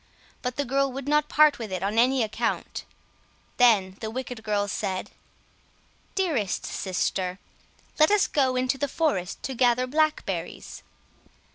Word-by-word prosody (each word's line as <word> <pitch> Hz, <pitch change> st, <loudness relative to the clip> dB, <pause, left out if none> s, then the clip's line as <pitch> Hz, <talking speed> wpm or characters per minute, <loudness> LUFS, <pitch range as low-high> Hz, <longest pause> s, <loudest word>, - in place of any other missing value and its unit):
But 250 Hz, -1 st, -3 dB
the 285 Hz, -, -1 dB
girl 275 Hz, +2 st, +1 dB
would 270 Hz, +1 st, -6 dB
not 300 Hz, 0 st, +2 dB
part 305 Hz, -2 st, +5 dB
with 220 Hz, -4 st, -6 dB
it 185 Hz, 0 st, -3 dB
on 210 Hz, +3 st, +1 dB
any 255 Hz, +1 st, +4 dB
account. 215 Hz, -, -3 dB, 0.7 s
Then 200 Hz, -6 st, +4 dB
the 220 Hz, -, -4 dB
wicked 250 Hz, 0 st, -5 dB
girls 205 Hz, -2 st, 0 dB
said— 185 Hz, -1 st, -3 dB, 1.0 s
"Dearest 300 Hz, -, 0 dB
sister, 185 Hz, -1 st, -2 dB, 0.6 s
let 310 Hz, -, +6 dB
us 415 Hz, -1 st, +4 dB
go 265 Hz, -3 st, +1 dB
into 255 Hz, +1 st, 0 dB
the 285 Hz, -, 0 dB
forest 270 Hz, -, -1 dB
to 265 Hz, -, -3 dB
gather 245 Hz, 0 st, +3 dB
blackberries." 310 Hz, +3 st, -2 dB
250 Hz, 140 wpm, -26 LUFS, 210-285 Hz, 1.0 s, let